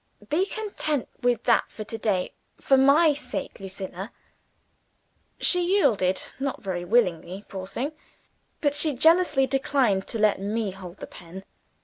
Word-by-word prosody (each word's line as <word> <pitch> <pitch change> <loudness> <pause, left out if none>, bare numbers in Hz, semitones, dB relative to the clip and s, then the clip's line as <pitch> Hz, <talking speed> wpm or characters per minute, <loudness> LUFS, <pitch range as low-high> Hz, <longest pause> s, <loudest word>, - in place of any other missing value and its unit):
Be 360 +6 +1
content 395 - -2
with 245 -2 +1
that 235 - +3
for 215 - -7
to 220 - -6
day. 195 -4 0 0.3
For 270 - +3
my 285 +4 +5
sake, 290 +1 -6
Lucilla!" 195 +1 -7 1.3
She 360 -1 +2
yielded 195 - +2 0.2
not 275 0 -2
very 180 -3 -3
willingly, 185 -2 0
poor 190 -2 -7
thing. 265 +9 -3 0.7
But 290 -2 +2
she 295 -1 +2
jealously 320 -1 +4
declined 265 -7 +1
to - - -3
let 210 -2 +2
me 210 +1 -1
hold 185 -1 -10
the - - -7
pen. 180 +2 -11
230 Hz, 140 wpm, -25 LUFS, 190-285 Hz, 1.3 s, my